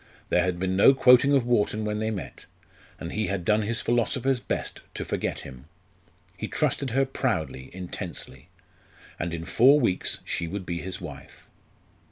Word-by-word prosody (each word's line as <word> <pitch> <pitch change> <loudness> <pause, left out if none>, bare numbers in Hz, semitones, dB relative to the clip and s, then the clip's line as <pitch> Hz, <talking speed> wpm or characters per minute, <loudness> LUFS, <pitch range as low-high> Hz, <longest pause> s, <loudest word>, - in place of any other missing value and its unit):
There 90 - +3
had 90 -1 -1
been 95 +1 -1
no 120 +8 +7
quoting 125 +2 +6
of 130 -4 +2
Wharton 110 -2 +1
when 105 0 -2
they 110 0 -1
met; 105 -4 -6 0.5
and 85 - -6
he 110 0 -1
had 95 -3 -2
done 105 +3 +3
his 115 +3 -1
philosopher's 125 +2 +1
best - - -4
to - - -4
forget - - -2
him. 65 -1 -11 0.7
He - - -5
trusted 135 - 0
her 135 +3 +2
proudly, 85 - -2
intensely; 90 -7 -6 0.7
and 85 - -2
in 85 0 -5
four 135 - +5
weeks 95 -9 +1
she 85 - -2
would 95 +2 -5
be 85 -1 -3
his 95 0 -4
wife. - - -10
105 Hz, 170 wpm, -26 LUFS, 90-120 Hz, 0.7 s, no